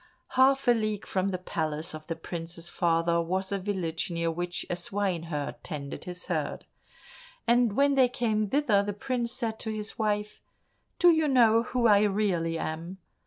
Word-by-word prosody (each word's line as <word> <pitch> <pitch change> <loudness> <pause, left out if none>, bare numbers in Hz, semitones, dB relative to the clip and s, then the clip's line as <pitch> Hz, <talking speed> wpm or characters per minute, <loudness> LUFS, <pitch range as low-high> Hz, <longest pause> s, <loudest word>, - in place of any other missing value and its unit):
Half 265 +1 +3
a - - +8
league 215 -3 -1
from 190 0 0
the 190 -2 -1
palace 160 -3 -3
of 155 0 -9
the 165 - -2
prince's 165 +1 -6
father 170 0 +1
was 190 +3 -2
a 200 - 0
village 185 -5 -2
near 170 -1 -1
which 175 +1 -4
a 175 - -2
swineherd 175 -5 -2
tended 145 -4 -6
his 180 -1 -6
herd, - - -3 0.8
and 235 -2 +3
when 280 +4 +3
they 260 -2 +4
came 215 -4 0
thither 245 -7 +3
the 205 0 -3
prince 240 +2 -2
said 225 -3 -3
to 220 - -4
his 215 +2 -5
wife, 210 -1 -1 0.6
"Do 350 - +7
you 320 -2 +2
know 230 -4 +5
who 245 0 -1
I 205 -3 +6
really 190 -5 0
am? 165 +4 -5
200 Hz, 170 wpm, -28 LUFS, 170-230 Hz, 0.8 s, a